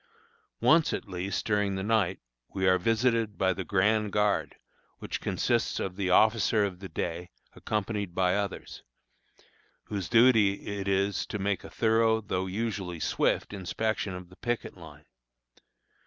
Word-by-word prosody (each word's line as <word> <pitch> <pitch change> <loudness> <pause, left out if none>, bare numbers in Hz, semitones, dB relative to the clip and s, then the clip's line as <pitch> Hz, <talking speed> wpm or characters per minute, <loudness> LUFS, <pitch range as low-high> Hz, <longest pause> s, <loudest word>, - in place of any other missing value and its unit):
Once, 160 0 +4
at - - -4
least, 95 +1 -3
during 105 -2 +1
the 95 - -3
night, 100 -4 +1 0.4
we 95 -1 +1
are 95 0 +4
visited 115 +1 +1
by 95 -1 +2
the 95 - -5
grand 105 +3 +1
guard, 105 0 +1 0.4
which - - -5
consists - - 0
of 95 -1 -3
the 95 -1 -1
officer 110 +1 +4
of 95 -3 -5
the 95 0 -8
day, 85 +2 -4 0.2
accompanied 105 -3 -3
by 90 -1 +2
others, 100 -1 -4 1.0
whose 100 -4 -5
duty 115 -4 +4
it 100 - -4
is 100 0 +1
to - - -4
make 100 -2 -1
a - - -9
thorough, 110 0 +2
though 95 -3 -3
usually 95 -4 -3
swift, - - 0
inspection 100 0 -2
of 90 -1 -9
the 90 - -17
picket 120 -1 -3
line. - - -13
100 Hz, 150 wpm, -28 LUFS, 95-110 Hz, 1.0 s, Once